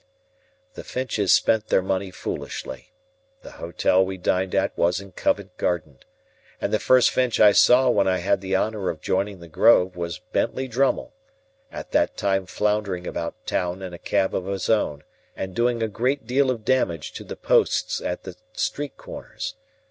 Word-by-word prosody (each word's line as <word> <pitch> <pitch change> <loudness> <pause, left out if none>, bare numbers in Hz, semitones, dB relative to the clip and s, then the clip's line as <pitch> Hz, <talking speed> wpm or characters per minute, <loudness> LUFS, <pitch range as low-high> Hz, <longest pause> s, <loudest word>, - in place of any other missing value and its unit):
The - - -8
Finches 120 -6 -1
spent 110 -1 +3
their 95 - +2
money 95 +1 -1
foolishly 90 - -6 0.5
(the - - -10
Hotel 95 +1 +2
we 95 0 -4
dined 90 +1 0
at - - +1
was 90 +2 +1
in 100 -1 -11
Covent 95 0 -1
Garden), 75 -6 -2 0.6
and - - -2
the - - +3
first 130 -1 +4
Finch 125 -3 +1
I 105 -1 +8
saw 125 +5 +5
when 100 -5 +3
I 95 -1 +2
had 95 +2 0
the 95 0 -1
honour 105 0 0
of 80 - -4
joining 95 +2 -2
the 85 - -10
Grove 90 +2 +4
was 85 -1 -4
Bentley 130 0 -2
Drummle, 130 +3 0 0.6
at - - -8
that 300 0 +1
time 95 -2 0
floundering 105 -3 -1
about 85 -1 -5
town 90 +1 -2
in 90 -2 -6
a 85 - -8
cab 95 -2 0
of 95 - -2
his 100 +1 -1
own, 75 -10 0 0.3
and 95 -1 -5
doing 120 0 +1
a - - +1
great 125 +5 -1
deal 130 +3 +2
of 115 -4 -2
damage 90 -12 0
to - - -8
the - - -7
posts - - +1
at 90 - -4
the 95 -2 -8 0.2
street 145 -2 -3
corners. - - -7
95 Hz, 180 wpm, -24 LUFS, 90-115 Hz, 0.6 s, I